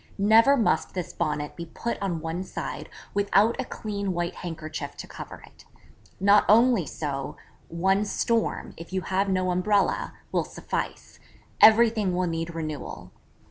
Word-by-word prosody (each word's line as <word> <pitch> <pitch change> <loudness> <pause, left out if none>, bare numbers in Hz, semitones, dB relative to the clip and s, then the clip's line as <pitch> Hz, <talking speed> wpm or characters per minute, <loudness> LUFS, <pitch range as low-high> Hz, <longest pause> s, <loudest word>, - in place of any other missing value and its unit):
Never 225 +7 +5
must 205 -5 +1
this 180 -2 -4
Bonnet 150 -3 -2
be 170 -1 -7
put 235 +8 -4
on 175 -5 -2
one 165 +3 -3
side 185 - -6 0.2
without 205 +2 +3
a - - -5
clean 200 -4 -4
white 175 0 -2
handkerchief 155 -4 -6
to - - -7
cover - - -10
it. - - -19 0.5
Not 200 +2 +5
only 225 - +5
so, 140 -2 -4 0.3
one 190 +5 +1
storm, 230 +2 -1
if 165 +2 -10
you 190 0 -1
have 190 +2 0
no 185 -1 +1
umbrella, 205 - +1 0.2
will - - +1
suffice; - - -5 0.4
everything 220 -4 +6
will 185 0 +1
need 165 0 -3
renewal. 155 -3 -6
185 Hz, 145 wpm, -26 LUFS, 165-210 Hz, 0.5 s, everything